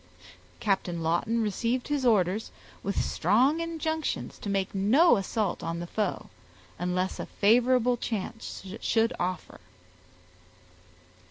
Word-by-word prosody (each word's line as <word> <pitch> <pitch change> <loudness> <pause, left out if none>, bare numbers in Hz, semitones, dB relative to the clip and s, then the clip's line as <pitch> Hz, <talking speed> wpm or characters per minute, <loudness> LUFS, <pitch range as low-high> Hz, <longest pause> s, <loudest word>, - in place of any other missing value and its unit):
Captain 180 -5 -1
Lawton 225 +8 +1
received 230 +4 -1
his 285 -3 +1
orders 205 -1 +2 0.3
with 200 -1 -2
strong 250 - +2
injunctions 320 -1 -3
to 205 - -5
make 195 -1 -1
no 240 - +5
assault 200 -1 -1
on 165 0 -3
the 175 - -4
foe, 205 +2 -3 0.5
unless 180 +1 -1
a - - -4
favorable 245 +3 +3
chance 225 -2 -5
should 230 +1 +1
offer. 180 -1 -3
215 Hz, 110 wpm, -28 LUFS, 185-245 Hz, 0.5 s, no